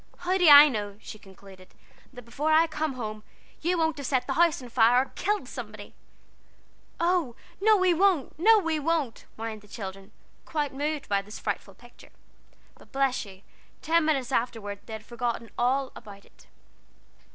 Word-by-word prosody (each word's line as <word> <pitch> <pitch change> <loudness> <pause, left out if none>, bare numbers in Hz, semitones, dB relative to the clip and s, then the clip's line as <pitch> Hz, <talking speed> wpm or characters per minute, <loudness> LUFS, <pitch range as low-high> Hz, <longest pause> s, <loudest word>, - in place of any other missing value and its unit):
"How 360 +1 -1
do 355 - +4
I 290 +1 +11
know," 205 -6 -4
she 215 - -10
concluded, 190 -1 -16 0.4
"that 245 -2 -11
before 290 +7 -2
I 320 +1 +5
come 310 -2 -3
home 215 -4 -6 0.4
you 350 +2 0
won't 320 -2 0
have 280 - -4
set 260 -3 0
the 270 - -2
house 335 +1 +3
on 250 -2 -10
fire, 240 +2 +4
or - - -20
killed 415 +1 -2
somebody?" - - -9 1.1
"Oh, 335 -8 0 0.3
no 430 +1 +5
we 370 -2 +3
won't! 355 -5 +2
no 440 +6 +6
we 330 -6 0
won't!" 300 -6 -2
whined 220 -1 -6
the 210 - -19
children, 195 -1 -8 0.3
quite 295 -4 -3
moved 290 +1 -3
by 200 -1 +1
this 210 +2 -10
frightful 195 - -5
picture. 240 +3 -18 0.7
But - - -19
bless 270 -3 0
you 195 -1 -14 0.4
ten 330 +1 +3
minutes 275 -5 0
afterward 220 -4 -2
they 225 - -8
had 220 0 -8
forgotten 235 -1 -4
all 260 +2 0
about 200 -3 -12
it. - - -23
260 Hz, 175 wpm, -27 LUFS, 220-320 Hz, 1.1 s, I